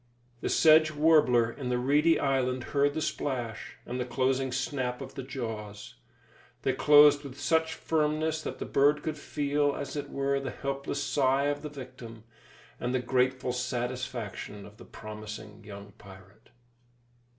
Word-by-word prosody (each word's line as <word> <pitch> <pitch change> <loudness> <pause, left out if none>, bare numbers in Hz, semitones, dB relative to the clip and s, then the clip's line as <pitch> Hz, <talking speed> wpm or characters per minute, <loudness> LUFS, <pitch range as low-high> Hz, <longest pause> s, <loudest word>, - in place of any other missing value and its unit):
The - - -3
sedge 155 0 +6
warbler 150 -7 +4
in 130 0 -6
the 125 - +1
reedy 150 +6 +3
island 130 -2 0
heard 145 0 +2
the 155 - -1
splash, 120 -5 -4
and 125 +1 -4
the - - 0
closing 130 +1 0
snap 125 -1 -2
of 135 -1 -8
the 135 - -6
jaws. 110 - -6 0.7
They 135 - +1
closed 145 +1 +6
with 140 0 -9
such 160 +1 +1
firmness 155 0 0
that - - -5
the - - -5
bird 145 +2 +3
could 155 -1 -2
feel, 145 0 0
as 140 - -5
it 145 - -4
were, 140 0 0
the 135 -1 -4
helpless 140 +1 -4
sigh 135 0 +2
of 145 0 -2
the 150 - -6
victim, 125 -5 -10 0.6
and 125 +1 -2
the - - +2
grateful 125 0 0
satisfaction 125 -4 -4
of 105 0 -15
the - - -13
promising 105 0 -9
young 100 0 -10
pirate. 100 +3 -16
130 Hz, 155 wpm, -29 LUFS, 120-145 Hz, 0.7 s, sedge